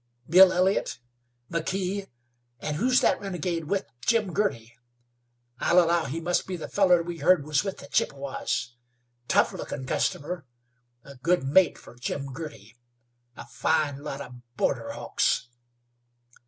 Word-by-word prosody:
Bill 185 +2 +8
Elliott, 185 -6 +1 0.5
McKee; 190 +4 -2 0.5
and 150 -1 -3
who's 250 +6 +3
that - - +2
renegade 180 -4 -3
with 195 +5 -1 0.2
Jim 215 - +1
Girty? 120 - -1 0.9
I'll 175 - +2
allow 170 -1 +4
he 145 +5 -3
must 175 +2 0
be 185 - -3
the 165 - -6
fellar 180 -4 +4
we 170 -1 -6
heard 160 -1 +4
was 150 -2 +1
with 195 -2 -4
the - - -11
Chippewas. 135 -3 -1 0.5
Tough - - +3
lookin' 130 - -6
customer; 160 +1 -2 0.6
a 140 -1 -13
good 170 +4 +1
mate 150 +5 +4
fer - - -14
Jim 135 +2 -4
Girty! 125 -8 -9 0.6
A - - -9
fine 145 +2 0
lot 140 -1 -5
of 125 - -9 0.2
border - - 0
hawks!" 125 - 0
165 Hz, 140 wpm, -27 LUFS, 140-185 Hz, 0.9 s, Bill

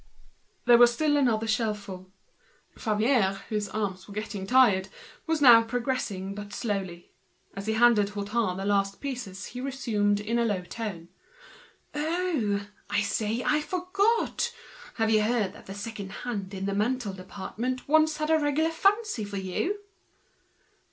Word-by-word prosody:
There 240 -1 +7
was 240 0 +8
still 295 +4 +1
another 235 -6 +2
shelf 220 -1 0
full. 185 -2 -10 0.6
Favier, 215 -2 +1
whose 210 -2 -2
arms 190 -4 -3
were 200 - -11
beginning 210 -2 -4
to - - -10
feel 260 - +8
tired, 190 -6 +4 0.4
was 320 -2 +1
now 235 -3 +9
going 235 +1 -3 0.5
very 205 0 -7
slowly. 195 -6 -4 0.4
As 195 +1 -6
he 220 - +1
handed 220 -3 +4
Hutin 205 -1 -1
the 195 - -4
last 200 -1 +1
pieces 235 -8 -5
he 250 - -5
resumed 220 -7 0
in 225 +3 -1
a - - +3
low 200 -5 -1
tone—"Oh! 230 - -4 0.2
I 205 +1 +2
say, 220 +3 -1
I 300 0 +2
forgot. 395 +8 0 0.4
Have 225 -1 +1
you 215 -1 +4
heard 215 -3 0
that - - -15
the 195 - -7
second 205 -1 -6
hand 200 -5 -4
in 190 0 -4
the 200 - -1
ready 210 +5 +2
made 195 -1 -5
department 225 +7 -5
once 310 +1 +4
had 305 0 -1
a 320 - +5
regular 300 +2 +1
fancy 395 - +1
for 200 -1 -5
you?" 195 - -2
220 Hz, 160 wpm, -27 LUFS, 200-265 Hz, 0.6 s, now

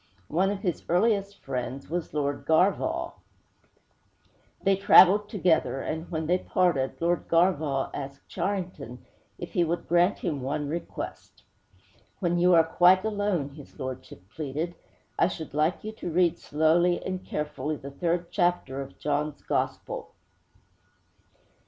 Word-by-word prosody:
One 185 +5 +2
of 200 -1 -3
his 180 -6 -2
earliest 200 +2 +2
friends 130 +1 -4
was 170 +2 -3
Lord 140 -2 -2
Garvagh. 320 - +2 1.5
They 195 0 +4
traveled 195 +1 +6
together, 170 - +1
and, 160 +4 -4
when 160 -2 -2
they 180 +3 +2
parted, 165 -10 0
Lord 170 +1 0
Garvagh 160 -6 +2
asked 140 0 -7
Charrington 175 - -4 0.3
if - - -8
he 175 - +3
would 170 +1 -2
grant 175 +3 +3
him 155 -7 -3
one 145 +3 -2
request. 165 +4 -6 0.7
'When 175 -2 0
you 180 0 +5
are 165 - +7
quite 180 +4 +4
alone,' 205 -9 -1
his 145 -1 -13
lordship 130 -7 -7
pleaded, 155 +4 -3 0.5
'I - - +5
should 160 -5 -7
like 155 +4 +1
you 215 - -4
to 220 -5 -6
read 175 0 +2
slowly 165 +4 +2
and 185 0 -3
carefully 150 0 -3
the 140 -1 -9
third 170 +3 -2
chapter 175 -6 0
of 135 0 -9
John's 150 0 -2
Gospel!' - - -2
170 Hz, 135 wpm, -27 LUFS, 145-185 Hz, 1.5 s, are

